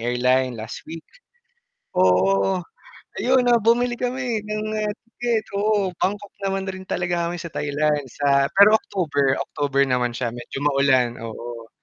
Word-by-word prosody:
airline 125 Hz, +1 st, +1 dB
last 110 Hz, +1 st, -7 dB
week. 165 Hz, 0 st, -8 dB, 0.9 s
Oo 95 Hz, -, +3 dB, 0.6 s
ayon 255 Hz, 0 st, +3 dB
na 240 Hz, -1 st, +4 dB
bumili 240 Hz, +3 st, +3 dB
kami 245 Hz, -3 st, -2 dB
ng 215 Hz, 0 st, -3 dB, 0.5 s
ticket 235 Hz, -3 st, -1 dB
oo 200 Hz, -2 st, +1 dB
Bangkok 205 Hz, +1 st, -2 dB
naman 195 Hz, 0 st, -1 dB
rin 190 Hz, 0 st, -7 dB
talaga 175 Hz, -1 st, -1 dB
kami 175 Hz, -, -4 dB
sa 165 Hz, -1 st, -8 dB
Thailand 150 Hz, 0 st, 0 dB
sa 140 Hz, 0 st, +2 dB
pero 205 Hz, +2 st, +8 dB
October, 145 Hz, -10 st, 0 dB
October 140 Hz, -1 st, -1 dB
naman 125 Hz, -2 st, 0 dB
siya 120 Hz, -3 st, -2 dB
medyo 120 Hz, +2 st, -8 dB
maulan 135 Hz, -4 st, +3 dB
,oo. 115 Hz, 0 st, -8 dB
150 Hz, 135 wpm, -22 LUFS, 125-205 Hz, 0.9 s, pero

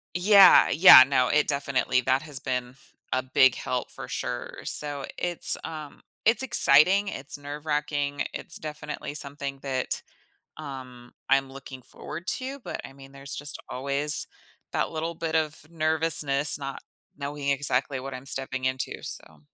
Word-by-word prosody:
Yeah, 195 Hz, +2 st, +7 dB
yeah, 165 Hz, -6 st, +10 dB
no, 130 Hz, -2 st, +2 dB
it 150 Hz, +2 st, +2 dB
definitely 140 Hz, -3 st, 0 dB
that 130 Hz, +2 st, +1 dB
has 145 Hz, -3 st, -7 dB
been 125 Hz, -1 st, -4 dB, 0.4 s
a 130 Hz, -, +1 dB
big 130 Hz, -1 st, +4 dB
help 125 Hz, -1 st, -4 dB
for -, -, -9 dB
sure, -, -, -5 dB
so 145 Hz, -2 st, -3 dB
it's 175 Hz, -1 st, +1 dB
um, 155 Hz, -3 st, -8 dB, 0.2 s
it's 225 Hz, +3 st, +3 dB
exciting, 195 Hz, -, +5 dB
it's 140 Hz, -3 st, -6 dB
nerve 145 Hz, +1 st, -8 dB
racking, 145 Hz, -1 st, -2 dB
it's 170 Hz, -, -5 dB
definitely 150 Hz, -4 st, -7 dB
something 140 Hz, -1 st, -4 dB
that, 130 Hz, -2 st, -3 dB, 0.6 s
um, 130 Hz, -5 st, -10 dB, 0.2 s
I'm 135 Hz, -1 st, +2 dB
looking 135 Hz, -1 st, -11 dB
forward 170 Hz, +7 st, -9 dB
to, 265 Hz, +2 st, -6 dB
but, -, -, -6 dB
I -, -, -10 dB
mean, 135 Hz, 0 st, -15 dB
there's 140 Hz, +1 st, -8 dB
just 145 Hz, -1 st, -1 dB
always 140 Hz, +3 st, 0 dB, 0.5 s
that -, -, -1 dB
little 165 Hz, +1 st, -4 dB
bit 160 Hz, -1 st, -4 dB
of 155 Hz, -1 st, 0 dB, 0.2 s
nervousness 155 Hz, -3 st, +2 dB
not 135 Hz, -1 st, -7 dB, 0.4 s
knowing 140 Hz, 0 st, -3 dB
exactly 135 Hz, -1 st, +1 dB
what 135 Hz, +1 st, -7 dB
I'm 130 Hz, +1 st, -9 dB
stepping 130 Hz, -1 st, -2 dB
into, 130 Hz, 0 st, -3 dB
so. 80 Hz, -2 st, -9 dB
140 Hz, 150 wpm, -26 LUFS, 135-155 Hz, 0.6 s, yeah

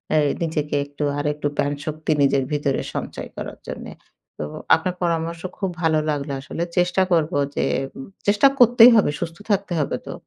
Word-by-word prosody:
এ -, -, +5 dB, 0.3 s
নিজেকে, 150 Hz, -2 st, -2 dB
একটু 145 Hz, +1 st, -6 dB, 0.2 s
আরেকটু 150 Hz, 0 st, -1 dB
প্রান 145 Hz, 0 st, +1 dB
শক্তি 155 Hz, +1 st, -3 dB
নিজের 135 Hz, -1 st, +3 dB
ভিতরে 145 Hz, -2 st, 0 dB
সঞ্চয় -, -, -5 dB
করার -, -, -6 dB
জন্য। -, -, -6 dB, 0.5 s
তো 75 Hz, -, -2 dB, 0.3 s
আপনার 175 Hz, +3 st, -3 dB
পরামর্শ 165 Hz, 0 st, -1 dB, 0.2 s
খুব 195 Hz, -, -1 dB
ভালো 160 Hz, -1 st, +3 dB
লাগলো 145 Hz, -1 st, -2 dB
আসলে। 165 Hz, +4 st, -4 dB
চেষ্টা 180 Hz, +1 st, +3 dB
করব। 160 Hz, -1 st, +2 dB, 0.2 s
যে -, -, +1 dB, 0.6 s
চেষ্টা 205 Hz, +7 st, +5 dB
করতেই 245 Hz, 0 st, +8 dB
হবে। 210 Hz, -9 st, +4 dB
সুস্থ 170 Hz, 0 st, -5 dB
থাকতে 200 Hz, -2 st, 0 dB
হবে 145 Hz, -, -1 dB
তো। -, -, -5 dB
160 Hz, 165 wpm, -22 LUFS, 150-180 Hz, 0.6 s, করতেই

